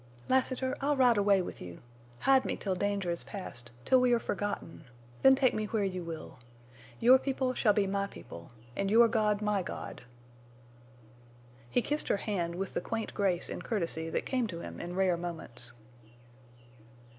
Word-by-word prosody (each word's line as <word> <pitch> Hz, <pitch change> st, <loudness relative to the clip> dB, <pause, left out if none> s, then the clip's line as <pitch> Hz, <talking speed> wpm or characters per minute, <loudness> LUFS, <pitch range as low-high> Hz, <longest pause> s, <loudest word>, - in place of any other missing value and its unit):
"Lassiter, 260 Hz, 0 st, +1 dB
I'll 285 Hz, +1 st, +1 dB
ride 245 Hz, -4 st, +5 dB
away 200 Hz, -2 st, +4 dB
with -, -, -8 dB
you. 90 Hz, -1 st, -8 dB, 0.4 s
Hide 270 Hz, -1 st, +5 dB
me -, -, -2 dB
till 195 Hz, -, -2 dB
danger 200 Hz, -1 st, -1 dB
is 170 Hz, -, -2 dB
past—till 125 Hz, -, -1 dB
we 250 Hz, -1 st, +4 dB
are 235 Hz, -, +3 dB
forgotten—then 160 Hz, -, 0 dB
take 260 Hz, -2 st, +3 dB
me 215 Hz, -, -1 dB
where 210 Hz, 0 st, -1 dB
you 185 Hz, -2 st, -2 dB
will. 160 Hz, -5 st, -8 dB, 0.6 s
Your 255 Hz, +2 st, +7 dB
people 260 Hz, -1 st, -1 dB
shall 215 Hz, -4 st, +3 dB
be 200 Hz, -1 st, +2 dB
my 200 Hz, +1 st, -1 dB
people, 85 Hz, -, -11 dB, 0.3 s
and 195 Hz, 0 st, -1 dB
your 230 Hz, +3 st, +7 dB
God 215 Hz, -2 st, +1 dB
my 210 Hz, -2 st, +1 dB
God!" -, -, -7 dB, 1.7 s
He 240 Hz, -, +1 dB
kissed 295 Hz, +1 st, -1 dB
her -, -, +2 dB
hand 175 Hz, -5 st, -2 dB
with 190 Hz, +1 st, -4 dB
the -, -, -1 dB
quaint 225 Hz, +4 st, -4 dB
grace 185 Hz, -4 st, +1 dB
and -, -, -5 dB
courtesy 165 Hz, -7 st, -1 dB
that -, -, -2 dB
came 255 Hz, -3 st, 0 dB
to 170 Hz, -4 st, -6 dB
him -, -, -8 dB
in 175 Hz, +1 st, -5 dB
rare 185 Hz, -2 st, +2 dB
moments. 155 Hz, -9 st, -4 dB
200 Hz, 170 wpm, -31 LUFS, 170-235 Hz, 1.7 s, Your